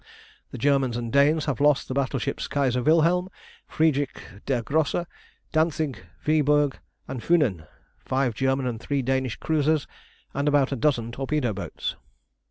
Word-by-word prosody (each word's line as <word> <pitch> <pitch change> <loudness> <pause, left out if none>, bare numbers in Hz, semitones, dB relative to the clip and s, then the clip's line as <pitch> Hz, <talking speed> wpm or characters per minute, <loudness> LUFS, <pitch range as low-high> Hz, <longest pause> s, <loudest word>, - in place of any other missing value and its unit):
The - - -8
Germans 135 -4 +2
and 120 0 -4
Danes 145 +3 +4
have 140 -3 -2
lost 145 -1 +3
the - - -3
battleships 135 -3 -2
Kaiser 130 -3 0
Wilhelm, 170 +6 +3 0.4
Friedrich 145 -4 +1 0.3
der 125 -4 0
Grosse, 155 +6 0 0.5
Dantzig, 155 -3 0 0.3
Viborg, 150 -2 +2 0.3
and 125 - -5
Funen, 120 - +1 0.4
five 130 -2 0
German 135 +2 0
and 120 -3 -3
three 140 +2 -1
Danish 130 -1 0
cruisers, 155 -1 +1 0.5
and 140 +1 -1
about 145 -2 +3
a - - 0
dozen 120 -4 0
torpedo 135 -2 -1
boats. 100 - -5
140 Hz, 140 wpm, -25 LUFS, 130-150 Hz, 0.5 s, Danes